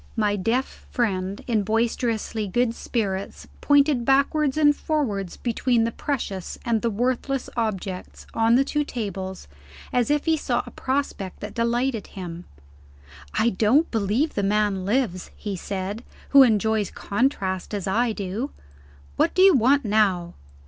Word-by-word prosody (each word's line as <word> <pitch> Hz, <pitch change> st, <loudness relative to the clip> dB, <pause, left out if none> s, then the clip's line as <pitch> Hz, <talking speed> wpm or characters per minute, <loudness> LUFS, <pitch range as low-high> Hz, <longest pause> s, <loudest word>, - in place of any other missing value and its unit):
My 210 Hz, -3 st, +1 dB
deaf 230 Hz, +7 st, -2 dB
friend, 195 Hz, -4 st, -1 dB
in 225 Hz, -4 st, +1 dB
boisterously 225 Hz, 0 st, -1 dB
good 235 Hz, +4 st, +1 dB
spirits, 200 Hz, -6 st, -3 dB
pointed 285 Hz, -3 st, +4 dB
backwards 275 Hz, +2 st, +2 dB
and 295 Hz, -1 st, +5 dB
forwards 215 Hz, -, -2 dB
between 235 Hz, 0 st, +1 dB
the 230 Hz, -, 0 dB
precious 210 Hz, -10 st, -4 dB
and 230 Hz, -3 st, +1 dB
the 235 Hz, -, +1 dB
worthless 255 Hz, +4 st, -1 dB
objects 195 Hz, -5 st, -4 dB
on 225 Hz, +1 st, +3 dB
the 265 Hz, -, +5 dB
two 295 Hz, +2 st, -1 dB
tables, 195 Hz, -, -5 dB, 0.5 s
as 245 Hz, 0 st, +2 dB
if 295 Hz, 0 st, +1 dB
he 325 Hz, -1 st, +3 dB
saw -, -, -1 dB
a -, -, -10 dB
prospect 260 Hz, -8 st, -3 dB
that 210 Hz, 0 st, -6 dB
delighted 235 Hz, 0 st, 0 dB
him. 175 Hz, -2 st, -8 dB, 0.9 s
"I 225 Hz, +2 st, +3 dB
don't 230 Hz, -, +3 dB
believe 225 Hz, +8 st, 0 dB
the 205 Hz, -, -1 dB
man 200 Hz, -1 st, +1 dB
lives," 205 Hz, -5 st, 0 dB
he 205 Hz, -2 st, -4 dB
said, 195 Hz, +4 st, -4 dB, 0.3 s
"who 275 Hz, -, +8 dB
enjoys 220 Hz, -4 st, +3 dB
Contrast 200 Hz, -5 st, -1 dB
as 200 Hz, -, -3 dB
I 225 Hz, +5 st, +1 dB
do. 210 Hz, +6 st, -3 dB, 0.7 s
What -, -, +2 dB
do 370 Hz, -, +5 dB
you 385 Hz, -1 st, +8 dB
want 270 Hz, +1 st, +3 dB
now?" 195 Hz, -5 st, +2 dB
225 Hz, 145 wpm, -24 LUFS, 200-260 Hz, 0.9 s, who